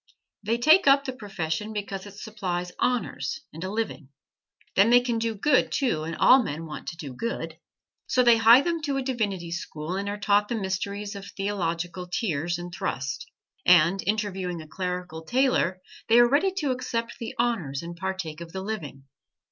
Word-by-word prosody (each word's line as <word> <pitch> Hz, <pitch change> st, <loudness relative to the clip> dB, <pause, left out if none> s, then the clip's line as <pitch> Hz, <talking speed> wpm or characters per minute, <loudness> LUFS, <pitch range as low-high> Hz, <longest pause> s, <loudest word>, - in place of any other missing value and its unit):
They 220 Hz, +3 st, 0 dB
take 310 Hz, +8 st, +5 dB
up 275 Hz, 0 st, +6 dB
the 260 Hz, -, -3 dB
profession 200 Hz, -3 st, -4 dB
because 200 Hz, -1 st, -5 dB
it 200 Hz, -, -12 dB
supplies 185 Hz, -5 st, -4 dB
honors 250 Hz, +5 st, -1 dB
and 160 Hz, +3 st, -7 dB
a 185 Hz, -, -3 dB
"living." 210 Hz, -10 st, -3 dB, 0.7 s
Then 200 Hz, +4 st, +5 dB
they 245 Hz, +1 st, +7 dB
can 240 Hz, -2 st, -1 dB
do 225 Hz, -1 st, -1 dB
good, 255 Hz, +6 st, +2 dB
too, 200 Hz, -, 0 dB
and 165 Hz, 0 st, -4 dB
all 260 Hz, +9 st, +6 dB
men 165 Hz, -6 st, -4 dB
want 155 Hz, -, -8 dB
to 165 Hz, -, -5 dB
do 145 Hz, -6 st, -7 dB
good. 230 Hz, -, -4 dB, 0.5 s
So 250 Hz, -, +3 dB
they 235 Hz, -1 st, +6 dB
hie 230 Hz, +3 st, +8 dB
them 335 Hz, +1 st, -1 dB
to 285 Hz, -3 st, -1 dB
a 270 Hz, -, -1 dB
divinity 205 Hz, -9 st, -2 dB
school 170 Hz, 0 st, -4 dB
and 200 Hz, +1 st, -2 dB
are 205 Hz, -, -3 dB
taught 205 Hz, 0 st, +2 dB
the 235 Hz, -, -2 dB
mysteries 200 Hz, +1 st, -3 dB
of 200 Hz, 0 st, -8 dB
theological 180 Hz, -3 st, -3 dB
tierce 175 Hz, -, -1 dB
and 175 Hz, 0 st, -7 dB
thrust; 130 Hz, -5 st, -3 dB, 0.3 s
and 180 Hz, +2 st, +5 dB
interviewing 195 Hz, -4 st, -1 dB
a 155 Hz, -, -10 dB
clerical 180 Hz, -2 st, -4 dB
tailor 245 Hz, -5 st, +1 dB, 0.3 s
they 230 Hz, -, +6 dB
are 240 Hz, 0 st, +8 dB
ready 300 Hz, +10 st, +3 dB
to 305 Hz, -8 st, -1 dB
accept 245 Hz, -2 st, -3 dB
the 230 Hz, -, -6 dB
honors 175 Hz, -, -1 dB
and 170 Hz, 0 st, -7 dB
partake 185 Hz, -3 st, -4 dB
of 165 Hz, -1 st, -9 dB
the 190 Hz, 0 st, -4 dB
living. 155 Hz, -11 st, -5 dB
200 Hz, 185 wpm, -26 LUFS, 175-235 Hz, 0.7 s, hie